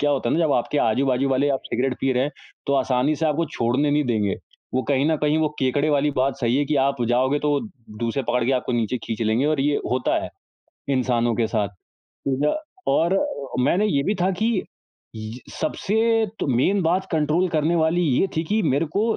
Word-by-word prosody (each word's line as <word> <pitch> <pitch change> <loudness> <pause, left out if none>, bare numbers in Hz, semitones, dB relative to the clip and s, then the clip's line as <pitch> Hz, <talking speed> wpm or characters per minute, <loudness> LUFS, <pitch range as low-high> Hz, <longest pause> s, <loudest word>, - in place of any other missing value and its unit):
क्या 145 0 +2
होता 135 -4 0
है - - +1
ना 160 - +1
जब 145 - +2
आपके 145 +4 0
आजू-बाजू 130 +3 +1
वाले 135 +2 +2
आप 135 - 0
सिगरेट 125 +2 -1
पी 135 -1 +1
रहे 125 +1 +1
हैं 145 - -3 0.4
तो 140 - +1
आसानी 135 +2 +1
से 160 +2 0
आपको 155 +2 +1
छोड़ने 130 +5 +1
नहीं 150 +1 +2
देंगे। 110 -5 0 0.4
वो 130 - +1
कहीं 140 0 +2
न 160 - +2
कहीं 150 +1 +2
वो 155 -1 +2
केकड़े 140 +3 +1
वाली 145 0 +2
बात 130 +1 +1
सही 120 +2 +1
है 145 - +2
कि 150 +1 0
आप 135 -2 0
जाओगे 130 +4 +2
तो 150 - -1
वो 145 - +2 0.4
दूर 115 0 -1
से 140 - -1
पकड़ 125 0 0
के 135 - +1
आपको 125 -1 -1
नीचे 120 +1 0
खींच 110 -1 -4
लेंगे 110 +6 +1
और 155 -2 +1
ये 145 +1 +2
होता 125 0 +1
है - - -5 0.7
इंसानों 120 -2 +1
के 115 -2 +1
साथ। 110 -3 0 0.4
तो 135 -1 -4
ना - - +2 0.4
और 170 +3 +2 0.5
मैंने 195 +9 +2
ये 140 -9 +1
भी 200 +9 0
था 185 - +3
कि - - +3
ये 225 -5 +1
स - - -24 0.9
सबसे 205 - -3 0.5
तो - - -1
मेन 195 +10 +2
बात 180 +3 +1
कंट्रोल 160 +3 +1
करने 160 0 +1
वाली 160 +2 +2
ये 150 +2 +2
थी 160 - +1
कि 210 +7 0
मेरे 140 +1 +1
को 205 - +2
140 Hz, 225 wpm, -23 LUFS, 125-155 Hz, 0.9 s, था